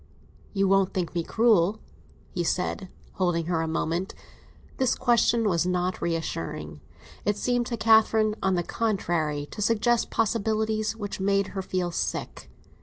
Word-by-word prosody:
"You 195 -1 +1
won't 195 -1 +2
think 180 -3 -2
me 170 -1 -1
cruel?" 220 -1 +3 0.5
he 175 - -2
said, 180 +2 -2 0.2
holding 175 -3 0
her 165 -1 0
a 165 - -1
moment. 165 +3 -2 0.6
This 260 -2 +2
question 235 -2 +3
was 175 -2 +1
not 180 0 -1
reassuring; 80 - -3 0.4
it 205 0 0
seemed 245 +1 0
to 235 - -3
Catherine, 220 -1 +4
on 190 -1 +2
the 175 - 0
contrary, 170 -10 -1
to - - -6
suggest 230 +2 +2
possibilities 220 0 0
which 205 -3 -5
made 200 0 +1
her 195 - -4
feel 185 -2 -2
sick. - - -4
195 Hz, 145 wpm, -26 LUFS, 175-220 Hz, 0.6 s, Catherine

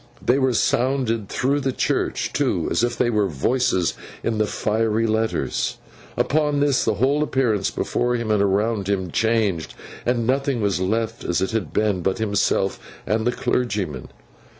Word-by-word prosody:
They 125 +3 +2
were 130 -2 +2
sounded 120 -4 +1
through 140 +3 +1
the 135 -1 -1
church, - - -1
too, - - 0
as - - +1
if 120 0 0
there 120 -1 +2
were 105 -3 +2
voices 90 - +1 0.3
in 110 -2 -1
the 110 - +2
fiery 110 +2 0
letters. 110 0 -1 0.4
Upon 150 -1 +1
this, 145 -2 +2
the 110 - +1
whole 135 +6 +2
appearance 125 -9 +1
before 120 0 -1
him 115 -2 -2
and 105 -2 +3
around 100 +1 +1
him 95 -3 -1
changed, 110 -7 0 0.3
and 120 -1 0
nothing 135 0 +1
was 100 -3 0
left 110 +4 -1
as 85 - 0
it 95 - -1
had 110 -3 -2
been, 105 -4 +1
but 95 +4 0
himself 100 -3 0 0.3
and 110 +4 0
the - - +3
clergyman. 105 - -2
110 Hz, 165 wpm, -22 LUFS, 100-125 Hz, 0.4 s, and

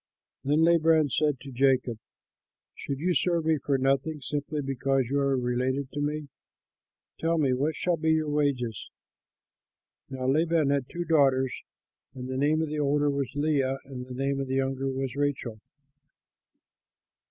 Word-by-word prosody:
Then 150 +3 +2
Laban 160 -3 +4
said 150 -2 +1
to 140 - -9
Jacob, 130 -3 +1 0.7
"Should 140 - -5
you 175 +5 0
serve 170 -2 +1
me 160 -2 +2
for 135 +1 0
nothing 135 +4 0
simply 145 +1 -3
because 135 0 0
you 140 +3 0
are 140 -1 +1
related 130 +2 -1
to 145 - -4
me? 150 0 -2 0.9
Tell 165 +1 +1
me 140 -5 +2
what 145 +5 0
shall 175 +1 0
be 160 0 +2
your 155 -1 0
wages?" 135 -7 -1 1.2
Now 130 -1 -5
Laban 155 +1 +2
had 140 -3 -1
two 175 0 -4
daughters: 135 -5 +3 0.6
the 125 - -7
name 150 +4 +2
of 160 - -3
the 150 0 -3
older 145 0 +2
was 140 -3 -2
Leah, 145 -3 +1
and 130 -2 -8
the 125 - -7
name 135 +1 -1
of 135 - -3
the 130 - -2
younger 135 0 -1
was 135 -1 -3
Rachel. 140 -6 -2
140 Hz, 155 wpm, -27 LUFS, 130-155 Hz, 1.2 s, Laban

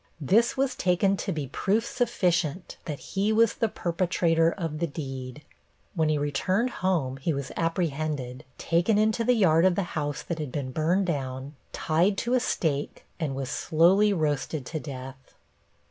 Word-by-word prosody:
This 210 - +3
was 270 -1 +1
taken 185 +2 +2
to 190 - -3
be 155 -5 -3
proof 200 - 0
sufficient 180 - -1
that 150 -3 -4
he 200 +8 -1
was 225 0 +4
the 225 - 0
perpetrator 170 -2 +1
of 165 -5 -4
the 170 - 0
deed. 135 -2 -7 0.5
When 160 -5 +1
he 155 - +2
returned 185 - 0
home 160 -9 0
he 155 +4 -1
was 140 -1 -4
apprehended, 155 -6 -2
taken 170 +6 +2
into 220 +2 +2
the 250 +2 +3
yard 165 -7 +4
of 185 -1 +4
the 200 - 0
house 145 -2 -2
that 170 -2 -4
had 150 -4 -4
been 130 -2 -3
burned 170 +7 +1
down, 135 -4 -3 0.2
tied 175 +6 +1
to 240 - -1
a 255 - +4
stake, 150 - -2
and 150 -5 -2
was 135 0 -4
slowly 180 +8 +4
roasted 155 -4 -1
to 155 +4 -4
death. 130 -2 -9
165 Hz, 165 wpm, -27 LUFS, 145-190 Hz, 0.5 s, was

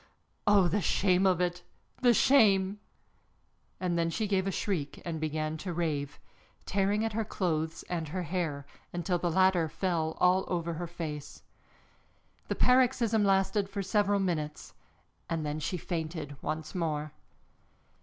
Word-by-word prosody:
Oh, 200 -3 +6
the 205 +4 +1
shame 185 +2 +3
of 185 -2 +3
it, 175 0 -1 0.4
the 245 -1 +6
shame!" 205 -6 +4 1.0
And 175 -2 0
then 165 0 +1
she 215 +6 -1
gave 195 -2 +1
a - - 0
shriek 170 -7 -2
and 165 -2 -3
began 155 0 -2
to 180 +2 -5
rave, 150 -4 -2 0.5
tearing 200 +3 +1
at 225 - -2
her 225 +1 0
clothes 160 -5 -2
and 165 -3 -3
her 180 +4 -3
hair, 160 -5 -2 0.3
until 175 +1 -1
the 175 - 0
latter 185 -2 +3
fell 165 -3 -1
all 185 +1 +4
over 170 -2 -2
her 170 +2 -4
face. 155 -4 -7 1.0
The - - -1
paroxysm 240 -4 +3
lasted 195 +1 +2
for 200 0 -3
several 205 +1 +2
minutes 155 -5 -3 0.6
and 165 -2 -1
then 150 +1 -2
she 180 +4 -2
fainted 160 -3 -4
once 155 +1 -4
more. 155 -4 -2
175 Hz, 145 wpm, -30 LUFS, 160-195 Hz, 1.0 s, Oh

